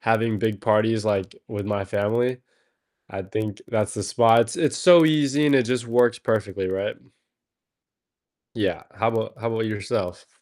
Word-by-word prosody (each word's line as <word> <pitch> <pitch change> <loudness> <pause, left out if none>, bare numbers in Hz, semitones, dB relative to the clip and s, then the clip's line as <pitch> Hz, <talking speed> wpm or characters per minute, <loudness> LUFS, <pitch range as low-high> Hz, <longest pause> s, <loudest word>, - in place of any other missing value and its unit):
having 115 -1 +1
big 105 -1 -2
parties, 110 0 +1
like, 100 -3 -1
with 100 -2 -5
my 100 -1 -2
family, 115 +6 -1 0.7
I 95 0 -6
think 105 +1 -5
that's 105 -3 -1
the 105 - -4
spot. 115 +1 +3
It's 150 -4 0
so 175 -3 +7
easy 150 -1 +2
and 140 - +4
it 130 - +4
just 125 +1 -2
works 120 0 +2
perfectly, 100 -5 -2
right? 95 +1 -3 1.6
Yeah, - - -2
how 110 +2 0
'bout 115 -1 -3
how 115 - -2
‘bout 110 0 -2
yourself? 100 -4 -4
110 Hz, 155 wpm, -23 LUFS, 105-120 Hz, 1.6 s, so